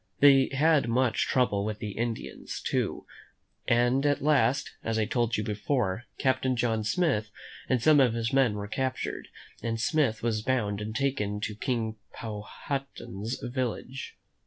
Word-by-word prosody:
They 135 Hz, -2 st, +7 dB
had 145 Hz, -2 st, +3 dB
much 125 Hz, 0 st, +2 dB
trouble 110 Hz, -6 st, +2 dB
with 105 Hz, 0 st, -3 dB
the 105 Hz, -2 st, -5 dB
Indians, 115 Hz, +2 st, -4 dB
too; -, -, -1 dB, 0.6 s
and 120 Hz, +3 st, +3 dB
at 145 Hz, -1 st, +2 dB
last, 145 Hz, -2 st, +3 dB
as 115 Hz, -1 st, -1 dB
I 110 Hz, -, +2 dB
told 120 Hz, 0 st, 0 dB
you 105 Hz, -, -1 dB
before, 105 Hz, 0 st, -1 dB
Captain 130 Hz, -1 st, +1 dB
John 115 Hz, -2 st, 0 dB
Smith 110 Hz, -, +1 dB, 0.4 s
and 125 Hz, -3 st, +2 dB
some 155 Hz, -2 st, +6 dB
of 125 Hz, -4 st, +4 dB
his 115 Hz, 0 st, -1 dB
men 130 Hz, -6 st, +4 dB
were 100 Hz, 0 st, -4 dB
captured, 130 Hz, +4 st, -3 dB, 0.3 s
and 115 Hz, -1 st, -2 dB
Smith 120 Hz, -3 st, +1 dB
was 110 Hz, -2 st, 0 dB
bound 105 Hz, -4 st, 0 dB
and 110 Hz, +1 st, -5 dB
taken 105 Hz, -6 st, 0 dB
to 105 Hz, -, -2 dB
King 110 Hz, -1 st, -2 dB, 0.2 s
Powhatan's 115 Hz, 0 st, -5 dB
village. 130 Hz, +1 st, -4 dB
120 Hz, 150 wpm, -28 LUFS, 110-135 Hz, 0.6 s, They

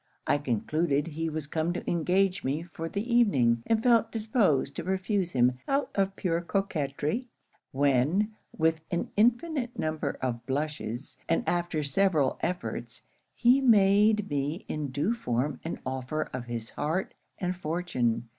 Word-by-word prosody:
I 145 Hz, -, +2 dB
concluded 145 Hz, +4 st, 0 dB
he 165 Hz, +1 st, -3 dB
was 155 Hz, -1 st, -3 dB
come 160 Hz, +3 st, -1 dB
to 180 Hz, -, -6 dB
engage 185 Hz, +3 st, +1 dB
me 145 Hz, +5 st, -1 dB
for 165 Hz, -1 st, -6 dB
the 205 Hz, +6 st, -3 dB
evening, 130 Hz, -, +4 dB
and 225 Hz, 0 st, +2 dB
felt 230 Hz, -2 st, +4 dB
disposed 210 Hz, -, +1 dB
to -, -, -3 dB
refuse 190 Hz, 0 st, -1 dB
him 125 Hz, 0 st, +3 dB
out 275 Hz, +1 st, 0 dB
of 195 Hz, -1 st, 0 dB
pure 170 Hz, -3 st, 0 dB
coquetry; 175 Hz, -, -2 dB, 0.4 s
when, 145 Hz, -, +2 dB, 0.3 s
with 160 Hz, -1 st, +2 dB
an 175 Hz, -, -2 dB
infinite 245 Hz, +4 st, +1 dB
number 155 Hz, 0 st, -2 dB
of 120 Hz, -2 st, -2 dB
blushes, 140 Hz, -3 st, -3 dB
and 165 Hz, -, +1 dB
after 175 Hz, -3 st, 0 dB
several 155 Hz, -2 st, +2 dB
efforts, 120 Hz, -9 st, -4 dB, 0.3 s
he 250 Hz, +3 st, +5 dB
made 210 Hz, -2 st, +5 dB
me 145 Hz, +4 st, -2 dB
in 150 Hz, -2 st, -3 dB
due 145 Hz, -, 0 dB
form 130 Hz, -, -1 dB
an 165 Hz, -, -4 dB
offer 130 Hz, +4 st, -2 dB
of 130 Hz, -1 st, -4 dB
his 115 Hz, -2 st, -5 dB
heart 165 Hz, +6 st, -2 dB, 0.2 s
and 180 Hz, 0 st, -2 dB
fortune. 155 Hz, -9 st, -1 dB
165 Hz, 145 wpm, -28 LUFS, 140-195 Hz, 0.4 s, he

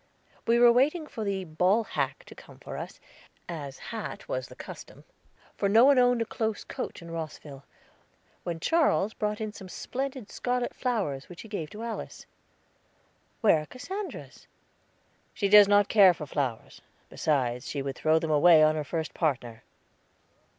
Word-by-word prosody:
We 230 Hz, +1 st, +4 dB
were 240 Hz, 0 st, +7 dB
waiting 295 Hz, +7 st, +2 dB
for 225 Hz, -7 st, -6 dB
the 195 Hz, -2 st, -2 dB
ball 180 Hz, +7 st, +2 dB
hack -, -, -3 dB
to -, -, -12 dB
come -, -, -15 dB
for -, -, -9 dB
us, -, -, -7 dB, 0.5 s
as 145 Hz, -5 st, -7 dB
that 220 Hz, -3 st, -6 dB
was 130 Hz, 0 st, -3 dB
the -, -, -13 dB
custom, -, -, -11 dB, 0.5 s
for 200 Hz, -, 0 dB
no 225 Hz, +5 st, +6 dB
one 280 Hz, -2 st, +6 dB
owned 245 Hz, -1 st, +3 dB
a -, -, -9 dB
close 220 Hz, -2 st, -3 dB
coach -, -, -6 dB
in 170 Hz, -, -10 dB
Rosville, 155 Hz, -4 st, -7 dB, 0.8 s
when 170 Hz, -2 st, -4 dB
Charles 260 Hz, -, +2 dB
brought 210 Hz, 0 st, -2 dB
in 215 Hz, -1 st, -4 dB
some 190 Hz, -3 st, -10 dB
splendid 260 Hz, +1 st, -5 dB
scarlet 245 Hz, 0 st, -2 dB
flowers 195 Hz, -, -2 dB
which 180 Hz, -, -10 dB
he -, -, -11 dB
gave 185 Hz, -8 st, -5 dB
to 215 Hz, +6 st, -8 dB
Alice. 230 Hz, -2 st, -6 dB, 1.2 s
"Where 205 Hz, -8 st, +5 dB
are 155 Hz, -, -10 dB
Cassandra's?" 380 Hz, +10 st, -7 dB, 0.9 s
"She 200 Hz, -, 0 dB
does 205 Hz, 0 st, +9 dB
not 205 Hz, 0 st, +4 dB
care 195 Hz, -5 st, +6 dB
for 150 Hz, -, -7 dB
flowers; 135 Hz, -5 st, -4 dB, 0.3 s
besides, 130 Hz, -4 st, -1 dB
she 140 Hz, -2 st, -3 dB
would 135 Hz, -1 st, -4 dB
throw 155 Hz, 0 st, +2 dB
them 160 Hz, -1 st, -1 dB
away 155 Hz, +1 st, +6 dB
on 155 Hz, 0 st, +5 dB
her 155 Hz, -1 st, -2 dB
first 160 Hz, +2 st, -4 dB
partner." 125 Hz, -8 st, -2 dB
195 Hz, 165 wpm, -28 LUFS, 155-230 Hz, 1.2 s, does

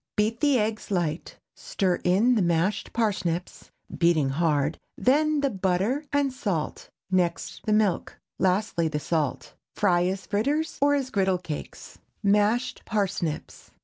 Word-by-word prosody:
Beat 220 Hz, +2 st, +1 dB
the 290 Hz, -3 st, +3 dB
eggs 215 Hz, 0 st, -2 dB
light, 175 Hz, -4 st, -2 dB, 0.2 s
stir 185 Hz, -3 st, -1 dB
in 200 Hz, +8 st, +4 dB
the 225 Hz, -, +2 dB
mashed 170 Hz, +3 st, 0 dB
parsnips, 185 Hz, -6 st, -2 dB, 0.3 s
beating 165 Hz, -5 st, +3 dB
hard; 150 Hz, 0 st, 0 dB, 0.2 s
then 300 Hz, +3 st, +2 dB
the 280 Hz, -, +2 dB
butter 195 Hz, -, 0 dB
and 285 Hz, -2 st, +1 dB
salt, 190 Hz, -11 st, -3 dB, 0.2 s
next 175 Hz, -2 st, -1 dB
the -, -, +2 dB
milk, 210 Hz, -4 st, +1 dB, 0.2 s
lastly 185 Hz, -2 st, +1 dB
the 150 Hz, -1 st, -2 dB
salt. 150 Hz, -4 st, -2 dB, 0.2 s
Fry 180 Hz, -4 st, +3 dB
as 190 Hz, +1 st, -3 dB
fritters, 285 Hz, +10 st, -1 dB
or 285 Hz, 0 st, +4 dB
as 265 Hz, -2 st, -2 dB
griddle 190 Hz, -2 st, +2 dB
cakes. 165 Hz, -5 st, -8 dB, 0.2 s
MASHED 210 Hz, +5 st, +2 dB
PARSNIPS. 185 Hz, -7 st, -3 dB
195 Hz, 135 wpm, -26 LUFS, 170-230 Hz, 0.3 s, in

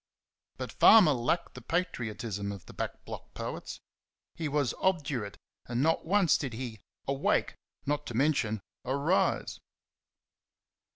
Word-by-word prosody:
But -, -, -5 dB
Farmer 205 Hz, -9 st, +8 dB
lacked 120 Hz, -3 st, 0 dB
the 125 Hz, -, -9 dB
patriotism 115 Hz, -, -2 dB
of 100 Hz, -3 st, -8 dB
the -, -, -12 dB
back -, -, -5 dB
block -, -, -9 dB
poets. -, -, -5 dB, 0.5 s
He 160 Hz, -, -3 dB
was 145 Hz, -4 st, +1 dB
obdurate, 140 Hz, -, 0 dB, 0.3 s
and 120 Hz, +2 st, 0 dB
not 160 Hz, 0 st, +1 dB
once 195 Hz, -2 st, +4 dB
did 135 Hz, -5 st, -3 dB
he 115 Hz, -2 st, -5 dB, 0.3 s
"awake," 140 Hz, 0 st, +1 dB, 0.3 s
not 145 Hz, +1 st, -1 dB
to 120 Hz, -, -5 dB
mention 120 Hz, -6 st, +1 dB, 0.2 s
"arise". 140 Hz, +8 st, +1 dB
135 Hz, 125 wpm, -30 LUFS, 115-155 Hz, 0.5 s, Farmer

